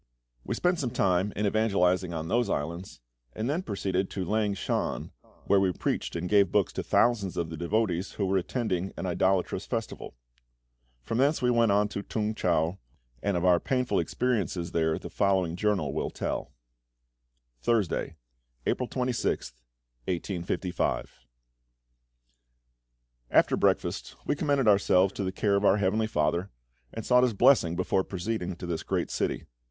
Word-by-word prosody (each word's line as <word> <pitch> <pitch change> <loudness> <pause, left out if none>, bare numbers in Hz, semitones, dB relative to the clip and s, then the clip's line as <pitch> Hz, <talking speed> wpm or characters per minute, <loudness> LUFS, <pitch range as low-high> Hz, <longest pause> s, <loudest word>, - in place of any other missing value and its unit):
We - - -3
spent 180 -1 +1
some 130 - -1
time 95 -4 +1
in 105 - -1
evangelising 95 -4 +2
on 80 -1 -4
those 120 +2 +1
islands, 85 0 -4 0.3
and 110 - -3
then 155 +6 0
proceeded 95 - -2
to 95 -2 -4
Lang 105 +1 0
shan, - - -2 0.3
where 100 - +4
we 95 -1 +2
preached - - -2
and 85 +1 -2
gave 100 0 +4
books 105 -3 +2
to - - -2
thousands 105 -6 +1
of 85 -1 -2
the - - -4
devotees 90 +2 -1
who 100 - -1
were 95 0 +2
attending 95 -2 -2
an - - -4
idolatrous 95 +1 0
festival. 115 -2 -4 0.9
From 115 - -2
thence 145 +4 +3
we 125 -2 +2
went 115 -3 +3
on 105 +1 +3
to 100 - -4
T'ung 110 +1 -2
chau, 85 -2 0 0.4
and 100 -3 0
of 85 - -1
our 90 -1 +5
painful 125 +1 0
experiences 100 -8 -1
there 80 -1 +1
the - - -7
following 95 -4 +1
journal 95 -8 0
will 80 - -2
tell: - - -4 1.1
Thursday, 110 - 0 0.5
April 125 - -1
26th, 125 - -2 0.5
1855. 90 -2 -2 2.1
After - - +4
breakfast - - 0
we 145 - +1
commended 140 -4 +1
ourselves 100 -2 +4
to 100 - -3
the 95 - -1
care 100 +1 +1
of 100 - +1
our 100 0 +5
Heavenly 105 +3 +1
FATHER, 85 +1 0 0.4
and 115 - -6
sought 125 0 +5
His 125 -4 +2
Blessing 95 -8 +4
before 90 +1 +1
proceeding 95 -1 -3
to 90 - -8
this 85 -2 -3
great - - -2
city. - - -2
100 Hz, 155 wpm, -28 LUFS, 90-110 Hz, 2.1 s, our